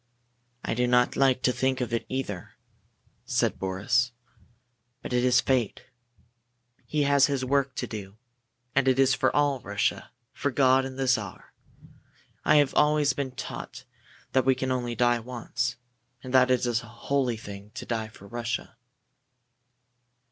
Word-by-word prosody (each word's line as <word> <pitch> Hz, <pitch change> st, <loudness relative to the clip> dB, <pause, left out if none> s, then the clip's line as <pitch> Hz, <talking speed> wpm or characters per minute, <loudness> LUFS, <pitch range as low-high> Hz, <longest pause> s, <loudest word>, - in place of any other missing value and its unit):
"I -, -, -1 dB
do 125 Hz, +2 st, +1 dB
not 125 Hz, 0 st, +3 dB
like 130 Hz, -2 st, +3 dB
to 125 Hz, -, +4 dB
think 130 Hz, +1 st, 0 dB
of 120 Hz, -2 st, -3 dB
it, 115 Hz, -, -1 dB
either," 110 Hz, -9 st, -4 dB, 0.7 s
said -, -, 0 dB
Boris, 115 Hz, +6 st, 0 dB, 0.9 s
"but -, -, -5 dB
it 125 Hz, 0 st, +2 dB
is 125 Hz, 0 st, +5 dB
fate. 125 Hz, -6 st, 0 dB, 1.0 s
He 150 Hz, -1 st, +1 dB
has 140 Hz, -1 st, +4 dB
his 135 Hz, -3 st, -1 dB
work 135 Hz, 0 st, +1 dB
to -, -, -2 dB
do, 100 Hz, -2 st, -8 dB, 0.6 s
and 135 Hz, -1 st, +2 dB
it 130 Hz, -1 st, +4 dB
is 135 Hz, 0 st, +4 dB, 0.2 s
all 145 Hz, -2 st, +2 dB
for -, -, -16 dB
Russia 100 Hz, 0 st, -1 dB, 0.2 s
for 145 Hz, -, -1 dB
God 130 Hz, 0 st, +4 dB
and 135 Hz, 0 st, -7 dB
the 135 Hz, -, -1 dB
Czar! 110 Hz, -7 st, -1 dB, 0.9 s
I 150 Hz, -, +4 dB
have 145 Hz, -2 st, +4 dB
always 150 Hz, -1 st, +3 dB
been 135 Hz, -2 st, -4 dB
taught 130 Hz, -1 st, -7 dB, 0.5 s
that 130 Hz, -, +3 dB
we 130 Hz, +1 st, +3 dB
can 130 Hz, +1 st, -3 dB
die 130 Hz, -, +1 dB
only 120 Hz, -2 st, -3 dB, 0.3 s
once, 120 Hz, 0 st, -3 dB, 0.5 s
and 130 Hz, -, -7 dB
that 130 Hz, -1 st, +5 dB
it 125 Hz, -1 st, +2 dB
is 120 Hz, -1 st, 0 dB
a 115 Hz, -, -13 dB
holy 120 Hz, +1 st, -1 dB
thing 100 Hz, -1 st, -9 dB
to -, -, -6 dB
die 110 Hz, -2 st, -2 dB
for 110 Hz, -2 st, -15 dB
Russia." 120 Hz, +1 st, -4 dB
125 Hz, 160 wpm, -27 LUFS, 120-135 Hz, 1.0 s, is